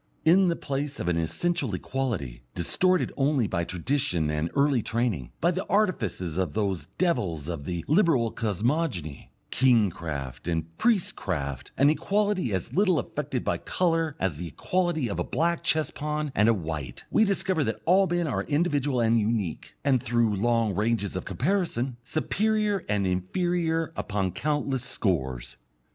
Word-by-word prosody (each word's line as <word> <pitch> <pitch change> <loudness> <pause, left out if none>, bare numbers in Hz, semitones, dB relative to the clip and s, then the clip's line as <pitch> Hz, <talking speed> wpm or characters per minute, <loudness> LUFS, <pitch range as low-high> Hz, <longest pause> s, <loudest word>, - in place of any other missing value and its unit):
In 180 +4 +6
the 170 - +2
place 140 0 -3
of - - -3
an 85 -1 +1
essential 125 - -1
equality, 95 - -3
distorted 180 - +2
only 140 -3 +2
by 90 -4 -1
tradition 90 - -1
and 75 +2 -1
early 140 -3 +3
training, 110 - -1
by 170 - +3
the 185 +2 -2
artifices 110 - 0
of 90 -6 -1
those 95 -8 -1
devils 90 - 0
of 85 -5 -4
the 85 -2 -3
Liberal 150 - +3
cosmogony, 105 - -2 0.2
"kingcraft" 85 - +1
and 80 0 -3
"priestcraft," 90 - 0
an 140 +2 +5
equality 200 - 0
as 95 -3 -2
little 190 -3 +3
affected - - -3
by - - 0
colour 165 -4 0
as 95 -6 -1
the 85 +2 -5
equality 165 - 0
of 100 - -3
a - - +1
black 170 +1 0
chess 155 -1 +1
pawn 150 0 -3
and 105 +3 +4
a - - +6
white, 80 - -5
we 220 - +5
discover 195 -5 +1
that 110 -4 -2
all 190 +3 +5
men 175 0 0
are 140 - -1
individual 145 -4 +1
and 115 0 +3
unique, 105 -6 -2
and, 130 -4 +3
through 120 -3 +1
long 115 0 +1
ranges 105 0 0
of 95 - -3
comparison, 130 - -1
superior 210 - 0
and 105 -2 +1
inferior 165 - 0
upon 95 -3 -1
countless 145 - -1
scores. 65 - -2
120 Hz, 155 wpm, -27 LUFS, -, 0.2 s, In